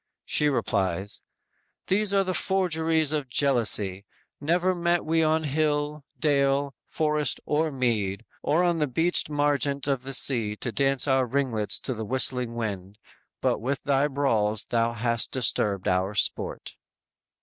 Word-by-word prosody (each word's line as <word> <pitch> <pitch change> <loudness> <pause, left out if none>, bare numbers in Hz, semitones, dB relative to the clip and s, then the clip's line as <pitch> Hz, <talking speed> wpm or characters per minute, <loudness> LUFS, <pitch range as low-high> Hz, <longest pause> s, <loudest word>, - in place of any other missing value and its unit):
She 150 - +2
replies: 100 -6 -2 0.6
_"These 205 +1 +1
are 195 -1 +3
the 185 -1 -2
forgeries 160 -5 +2
of 145 -4 -2
jealousy; 110 -8 +1 0.4
Never 175 +5 +1
met 175 -1 0
we 165 +1 +1
on 160 0 +2
hill, 150 0 -1 0.2
dale, 140 -1 +1
forest 150 -3 -1
or 155 +1 0
mead; 115 -6 -1 0.2
Or 165 +4 +1
on 175 -2 +1
the 150 - +1
beached 165 +5 +1
margent 145 -1 0
of 135 -3 0
the 135 +1 -5
sea 115 -5 +2
To 120 - -4
dance 135 +5 +2
our 130 -2 +2
ringlets 120 -5 0
to 130 - -2
the 110 -1 -5
whistling 125 0 0
wind, 100 -3 -5 0.4
But - - 0
with 135 +4 -2
thy 140 0 +2
brawls 110 -7 0
thou 115 0 0
hast 115 0 -1
disturbed 105 -6 0
our 95 +3 0
sport!" - - -2
135 Hz, 145 wpm, -26 LUFS, 115-155 Hz, 0.6 s, are